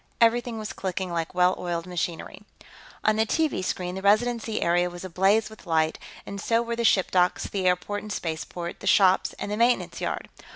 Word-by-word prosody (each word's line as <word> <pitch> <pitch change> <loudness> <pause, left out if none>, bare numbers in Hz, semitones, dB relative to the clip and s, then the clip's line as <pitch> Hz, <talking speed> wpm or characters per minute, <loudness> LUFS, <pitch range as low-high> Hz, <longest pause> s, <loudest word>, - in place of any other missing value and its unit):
Everything 235 0 +2
was 215 -1 -5
clicking 185 -1 -3
like 170 0 -3
well 180 0 +4
oiled 170 -1 -3
machinery. 175 -2 -4 0.6
On 215 0 +3
the 220 - +3
TV 310 -11 0
screen, 180 -1 -2
the 190 - -5
Residency 220 +2 +2
area 175 +1 +2
was 175 +1 -8
ablaze 195 +5 +2
with 220 -3 -14
light, 160 -1 +1 0.3
and 200 0 -6
so 230 +1 +2
were 235 0 -3
the 235 - -2
ship 195 -4 +3
docks, 180 0 +2
the 190 -2 -2
airport 180 +3 0
and 210 - -8
spaceport, 170 0 -4
the 200 - -7
shops, 190 -1 +4
and 205 - -6
the 210 - -1
maintenance 240 +2 +1
yard. - - -3
190 Hz, 195 wpm, -26 LUFS, 180-220 Hz, 0.6 s, well